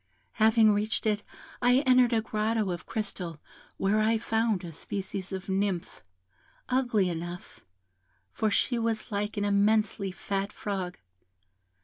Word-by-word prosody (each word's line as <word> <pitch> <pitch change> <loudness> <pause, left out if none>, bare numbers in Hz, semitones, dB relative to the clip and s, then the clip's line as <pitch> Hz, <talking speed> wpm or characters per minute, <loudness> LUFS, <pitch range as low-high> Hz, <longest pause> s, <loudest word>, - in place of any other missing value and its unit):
Having 220 -1 +6
reached 210 +2 -1
it, 210 -1 +1 0.4
I 245 0 +5
entered 255 -3 +5
a 225 -1 +2
grotto 215 -2 0
of 175 0 -6
crystal, 180 -7 -4 0.4
where 200 +2 +2
I 220 +1 +3
found 220 -3 0
a 165 - -7
species 195 +2 -4
of 190 0 -5
Nymph, 190 -2 -1 0.7
ugly 240 -7 +2
enough, 175 +1 -6 0.7
for 220 - 0
she 240 +3 +1
was 225 -1 -1
like 210 +1 -2
an 205 - 0
immensely 205 -1 +2
fat 195 +2 -3
frog. 190 -4 -4
210 Hz, 130 wpm, -28 LUFS, 195-220 Hz, 0.7 s, Having